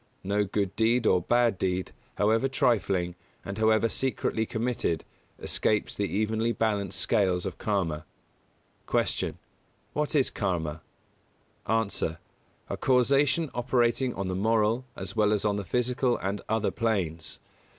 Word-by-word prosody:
No 100 +2 +1
good 100 -1 -1
deed 115 +1 +2
or 90 -4 +4
bad 120 0 +2
deed, 90 -1 -1 0.2
however 110 +5 +3
trifling, 100 -9 +1 0.3
and 100 +2 -5
however 110 +1 +4
secretly 115 -2 -1
committed, 115 -8 -1 0.3
escapes 105 -1 0
the 105 - -1
evenly 110 +4 0
balanced 100 -5 -1
scales 95 -3 +1
of 95 - -5
Karma. 90 -8 -1 0.8
172. - - 0
Q. - - -22 0.6
What 150 +1 -1
is 135 -3 +3
Karma? 80 -6 -2 0.9
A. 115 +1 +2 0.8
A - - -4
causation 140 +4 +3
operating 120 0 +1
on 100 - -3
the 95 - -2
moral, 110 +4 +2
as - - -6
well 105 -1 +3
as 105 0 +1
on 105 -1 +2
the 100 - -3
physical 125 +5 +1
and 100 +2 -3
other 110 -1 +1
planes. 90 -9 -1
110 Hz, 135 wpm, -28 LUFS, 95-120 Hz, 0.9 s, or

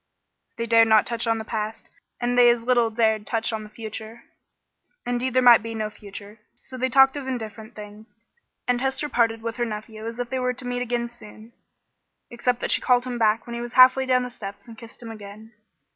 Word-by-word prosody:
They 230 - -2
dared 230 0 +5
not 220 -1 +5
touch 235 0 -3
on 225 0 +2
the 220 - -6
past, 215 0 -5 0.3
and 245 0 -1
they 245 -1 +7
as 240 -1 +1
little 240 -2 +2
dared 220 -2 0
touch 225 0 -1
on 220 - -3
the 210 - -11
future 220 +1 -8 0.8
indeed 245 +1 -2
there 255 - +4
might 240 -2 +8
be 225 +1 -6
no 215 -1 -3
future. 205 +1 -11 0.2
So 260 - -9
they 260 +1 -1
talked 270 +2 +5
of 280 -2 -6
indifferent 225 -2 -6
things, 210 +1 -12 0.5
and 245 0 +1
Hester 270 +2 -1
parted 225 -3 +1
with 230 0 -4
her 240 - 0
nephew 215 0 -7
as 230 0 -6
if 245 -1 -5
they 260 - -1
were 250 0 0
to 250 +1 -7
meet 245 0 -3
again 240 -1 -2
soon, 225 -1 -13 0.8
except 240 0 -1
that - - -1
she - - +4
called 250 -1 +2
him 245 -1 -4
back 220 0 +2
when 235 - -8
he 235 - -4
was 240 0 -7
halfway 260 +1 +6
down 255 -1 +3
the 250 - -6
steps 200 -2 -9
and 230 - -11
kissed 230 +2 -13
him 225 - -7
again. 215 +1 -11
230 Hz, 220 wpm, -24 LUFS, 220-245 Hz, 0.8 s, might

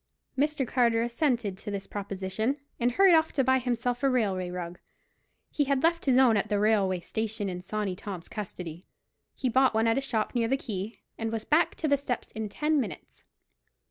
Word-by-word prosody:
Mr. 285 -1 0
Carter 235 -2 +2
assented 235 -5 0
to - - -6
this 200 -1 -4
proposition, 200 +5 -3 0.2
and 240 0 +1
hurried 390 +4 +6
off 320 -1 +4
to 270 - +2
buy 260 +1 +3
himself 245 0 -1
a 275 - +3
railway 195 -8 0
rug; 175 -1 -6 0.7
he 290 - +1
had 275 -1 +1
left 335 +1 +2
his 255 -2 +5
own 255 -4 +6
at 200 - -1
the 205 - +1
railway 200 -3 +2
station 220 +2 -3
in 180 -1 -4
Sawney 200 0 -3
Tom's 185 -3 -7
custody. 180 -5 -6 0.5
He 260 - -1
bought 260 0 +3
one 220 +1 +3
at 230 +3 +3
a - - -3
shop 230 -6 -1
near 235 -2 +1
the 270 +3 +1
quay, 210 -4 -6 0.2
and 225 0 -2
was 225 -1 -3
back 320 +3 +3
to 315 - -2
the 285 -1 +4
steps 260 -3 -4
in 220 -1 -4
ten 300 +7 +1
minutes. 230 - -8
230 Hz, 200 wpm, -28 LUFS, 200-265 Hz, 0.7 s, hurried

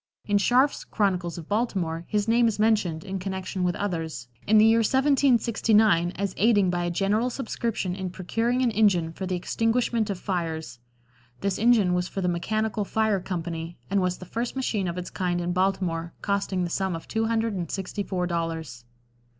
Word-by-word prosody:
In 205 -1 +2
Scharf's 255 +7 +3
"Chronicles 180 -5 -1
of 165 -2 -8
Baltimore" 185 -7 -1
his 210 0 0
name 235 +1 +4
is 225 - -1
mentioned, 210 -7 +1
in 195 -1 -4
connection 190 0 -4
with 175 -1 +1
others, 160 -10 -4 0.2
in 215 +1 +5
the 215 - +7
year 225 +1 +5
1769 230 - +3
as 200 -1 -2
aiding 205 -4 +4
by 175 -1 -1
a - - 0
general 205 +7 +1
subscription 230 -6 -3
in 190 0 -4
procuring 225 +8 -1
an 240 - +2
engine 185 -7 +2
for 190 +2 -5
the 185 - -1
extinguishment 225 +3 0
of 200 - -2
fires; 160 -9 -3 0.6
this 195 -1 -1
engine 220 -5 +4
was 180 0 0
for 195 - -4
the 180 - 0
"Mechanical 215 +4 -1
Fire 215 0 +1
Company," 170 -2 -5
and 200 -1 +3
was 180 -1 0
the 185 - -10
first 235 +7 -3
machine 220 -7 -1
of 170 +1 -3
its 180 - -5
kind 180 -2 -1
in 175 0 -1
Baltimore, 180 -3 0
costing 200 -2 0
the 175 - -3
sum 190 -2 -1
of 165 - -8
two 225 0 0
hundred 225 -1 0
and 175 -4 -4
sixty 195 +2 -4
four 185 -2 -2
dollars. 165 -8 -4
195 Hz, 185 wpm, -26 LUFS, 175-220 Hz, 0.6 s, the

